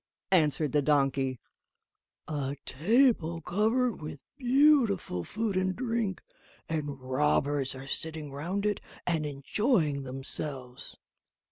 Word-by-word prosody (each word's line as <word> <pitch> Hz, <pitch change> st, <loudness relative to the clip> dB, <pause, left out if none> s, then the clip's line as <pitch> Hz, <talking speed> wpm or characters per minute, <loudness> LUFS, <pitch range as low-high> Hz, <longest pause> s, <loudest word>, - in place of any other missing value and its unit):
answered 155 Hz, -4 st, +3 dB
the 145 Hz, -, +3 dB
donkey: 135 Hz, -3 st, +1 dB, 0.9 s
"a 145 Hz, -2 st, -3 dB
table 170 Hz, -, +2 dB
covered 220 Hz, +7 st, +1 dB
with 150 Hz, -2 st, -6 dB, 0.2 s
beautiful 255 Hz, -, +3 dB
food 215 Hz, -, -2 dB
and 185 Hz, 0 st, +1 dB
drink, 230 Hz, -6 st, -2 dB, 0.4 s
and 145 Hz, -4 st, -3 dB
robbers 135 Hz, +1 st, +1 dB
are 135 Hz, +1 st, -8 dB
sitting 155 Hz, +1 st, -3 dB
round 175 Hz, +9 st, -3 dB
it 210 Hz, -1 st, 0 dB, 0.2 s
and 160 Hz, -4 st, 0 dB
enjoying 150 Hz, -, +1 dB
themselves." 135 Hz, -1 st, -6 dB
155 Hz, 105 wpm, -29 LUFS, 140-210 Hz, 0.9 s, answered